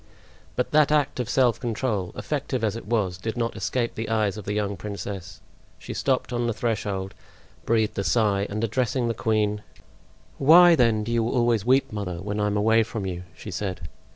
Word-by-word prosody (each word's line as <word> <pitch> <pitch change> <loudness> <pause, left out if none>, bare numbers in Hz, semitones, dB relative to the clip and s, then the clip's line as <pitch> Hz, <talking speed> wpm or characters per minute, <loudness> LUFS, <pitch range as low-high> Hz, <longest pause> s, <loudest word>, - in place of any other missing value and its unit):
But 125 - -1
that 150 -1 +4
act 145 -3 +1
of 120 -2 -2
self 125 -3 +3
control, 115 -6 -2
effective 140 -5 -3
as 110 -1 0
it 115 - -8
was, 100 -6 0
did 110 +4 -4
not 115 -1 -1
escape 115 +4 -1
the 110 +1 -5
eyes 105 -3 +1
of 105 -3 -8
the 105 - -2
young 100 -1 -1
princess. 95 -2 -7 0.4
She - - -7
stopped 130 -2 -1
on 120 0 0
the 115 - -1
threshold, 100 -5 -2 0.5
breathed 110 -3 +1
a - - 0
sigh, 100 -2 +2
and 105 +2 -3
addressing 120 +1 0
the - - 0
queen: 105 -1 0 0.8
"Why, 170 +5 +8
then, 115 -7 +3
do 115 - -4
you 115 -1 +1
always 120 -4 +1
weep, 130 +2 +3
mother, 100 -4 -3
when 105 +3 -4
I 105 - +1
am 105 0 0
away 110 +2 +4
from 110 -2 -4
you?" 90 -1 -5
she 105 - -8
said. 90 0 -4
110 Hz, 195 wpm, -25 LUFS, 100-120 Hz, 0.8 s, Why